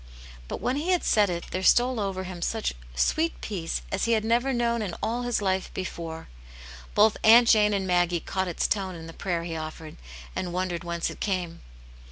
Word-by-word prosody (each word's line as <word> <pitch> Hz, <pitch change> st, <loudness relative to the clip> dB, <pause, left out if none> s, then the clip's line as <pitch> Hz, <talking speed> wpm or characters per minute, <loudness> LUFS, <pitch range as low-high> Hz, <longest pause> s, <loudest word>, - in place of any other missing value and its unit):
'* -, -, -17 dB
But -, -, -5 dB
when 255 Hz, +2 st, 0 dB
he 315 Hz, +5 st, -2 dB
had 360 Hz, -2 st, +2 dB
said 210 Hz, -2 st, +3 dB
it 170 Hz, -1 st, -3 dB
there 185 Hz, -, -2 dB
stole 245 Hz, +5 st, +4 dB
over 195 Hz, -2 st, -2 dB
him 180 Hz, -2 st, -7 dB
such -, -, -1 dB, 0.2 s
sweet 320 Hz, -, +1 dB
peace 175 Hz, -6 st, -3 dB
as 195 Hz, -, 0 dB
he 230 Hz, -, +2 dB
had 220 Hz, -1 st, +1 dB
never 240 Hz, +4 st, +2 dB
known 235 Hz, -2 st, +1 dB
in 190 Hz, -5 st, -3 dB
all 235 Hz, +2 st, -1 dB
his 245 Hz, -3 st, -1 dB
life 190 Hz, -1 st, 0 dB
before: 165 Hz, -3 st, -5 dB, 0.7 s
both 215 Hz, +1 st, +5 dB
Aunt 235 Hz, +2 st, +8 dB
Jane 210 Hz, -2 st, +5 dB
and 195 Hz, -2 st, 0 dB
Maggie 175 Hz, -1 st, +2 dB
caught 190 Hz, +3 st, -2 dB
its 175 Hz, -, 0 dB
tone 190 Hz, -3 st, -1 dB
in 165 Hz, -1 st, -9 dB
the 165 Hz, -, -9 dB
prayer 170 Hz, -2 st, -2 dB
he 165 Hz, -1 st, -4 dB
offered, 155 Hz, 0 st, -7 dB, 0.4 s
and 175 Hz, -2 st, -3 dB
wondered 180 Hz, -2 st, -2 dB
whence 170 Hz, -1 st, -2 dB
it -, -, -11 dB
came. 180 Hz, -4 st, -2 dB
190 Hz, 210 wpm, -26 LUFS, 170-225 Hz, 0.7 s, Aunt